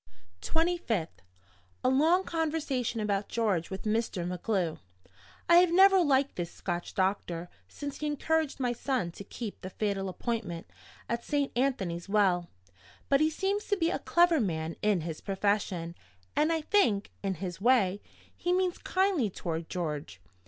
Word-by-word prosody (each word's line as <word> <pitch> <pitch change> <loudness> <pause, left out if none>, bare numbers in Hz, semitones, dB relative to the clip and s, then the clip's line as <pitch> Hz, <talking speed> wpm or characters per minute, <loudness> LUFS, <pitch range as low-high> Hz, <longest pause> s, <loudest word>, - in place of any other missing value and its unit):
"25th. 320 - -1 0.6
A - - +4
long 320 +8 +4
conversation 300 -9 -1
about 205 -1 0
George 205 -8 0
with 190 0 -6
Mr. 215 -4 -1
MacGlue. 180 -2 -1 0.7
I 345 - +7
have 355 -1 +6
never 385 +1 +7
liked 280 -3 +2
this 175 -2 -2
Scotch 175 0 -5
doctor 180 -3 -1 0.2
since 285 - -7
he 300 - -2
encouraged 305 0 0
my 245 -2 +1
son 240 -8 -1
to 200 - -9
keep 215 +1 -7
the 185 - -6
fatal 195 -1 -2
appointment 190 -4 -3 0.4
at 235 0 -2
Saint 285 -2 0
Anthony's 195 -10 -1
Well. 190 -4 +3 0.6
But 275 +1 +4
he 310 - +4
seems 390 +6 -1
to 405 - +1
be 335 -2 +1
a - - -1
clever 345 -2 +4
man 165 -6 -2
in 205 -4 +2
his 160 -1 -5
profession 195 -4 -1 0.4
and 305 +2 +3
I 325 -1 +1
think, 240 - +2
in 195 -1 -1
his 180 +1 -6
way, 205 -5 +3 0.3
he 355 - -1
means 365 -1 +1
kindly 370 - +1
toward 165 -3 -4
George. 150 - -4
225 Hz, 150 wpm, -30 LUFS, -, 0.7 s, I